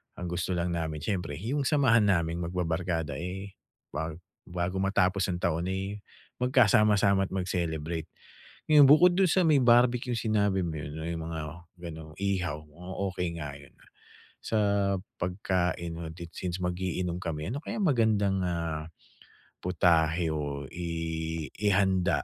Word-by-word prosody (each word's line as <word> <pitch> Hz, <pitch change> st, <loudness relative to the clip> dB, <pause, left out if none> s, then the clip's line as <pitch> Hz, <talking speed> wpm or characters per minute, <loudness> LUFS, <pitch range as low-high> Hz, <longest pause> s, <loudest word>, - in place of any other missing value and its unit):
ang 90 Hz, -, -5 dB
gusto 90 Hz, +1 st, -1 dB
lang 85 Hz, 0 st, -1 dB
namin 80 Hz, -2 st, -3 dB
syempre 90 Hz, -8 st, -2 dB
'yong 130 Hz, -, -1 dB
samahan 130 Hz, -7 st, +4 dB
naming 85 Hz, -3 st, +1 dB
magbabarkada, 85 Hz, -3 st, -2 dB
eh, 95 Hz, +3 st, -5 dB, 0.4 s
bag 80 Hz, +1 st, -3 dB, 0.3 s
bago 90 Hz, +2 st, -2 dB
matapos 100 Hz, -1 st, +2 dB
ang 90 Hz, -2 st, -2 dB
taon, 85 Hz, 0 st, 0 dB
eh, 95 Hz, +2 st, -3 dB, 0.4 s
magkasama-sama 105 Hz, -6 st, +4 dB
at -, -, -19 dB
mag-celebrate. 85 Hz, -3 st, -2 dB, 0.6 s
Ngayon, 150 Hz, -2 st, +8 dB
bukod 175 Hz, +5 st, +7 dB
do'n 190 Hz, 0 st, +4 dB
sa 185 Hz, -, +4 dB
may 150 Hz, -3 st, +5 dB
barbecue 120 Hz, 0 st, +4 dB
sinabi 105 Hz, -3 st, +1 dB
mo 80 Hz, -2 st, -4 dB
'yon, 75 Hz, -1 st, -6 dB
'no, 80 Hz, 0 st, -5 dB
'yong 85 Hz, -1 st, -3 dB
mga 80 Hz, -, -3 dB, 0.4 s
gano'ng 80 Hz, -2 st, -8 dB
ihaw, 95 Hz, -6 st, -1 dB
mukhang 90 Hz, +5 st, -9 dB, 0.2 s
okey 90 Hz, 0 st, -1 dB
nga 75 Hz, -2 st, -4 dB
'yon, 70 Hz, -, -16 dB
ah. -, -, -22 dB, 0.5 s
Sa 110 Hz, -, -1 dB, 0.6 s
pagkain 90 Hz, -2 st, -1 dB
o 85 Hz, -1 st, -5 dB
dit 85 Hz, 0 st, -9 dB
since 90 Hz, +1 st, -4 dB
mag-iinom 90 Hz, -1 st, -2 dB
kami, 80 Hz, -1 st, -3 dB
ano 135 Hz, -, -2 dB
kaya -, -, -5 dB
magandang, 110 Hz, -, +2 dB
ah, 85 Hz, -3 st, -2 dB, 0.8 s
putahe 85 Hz, -2 st, +2 dB
o 70 Hz, -2 st, -3 dB
i 80 Hz, -2 st, -3 dB
ihanda 95 Hz, -7 st, +2 dB
90 Hz, 145 wpm, -29 LUFS, 80-100 Hz, 0.8 s, Ngayon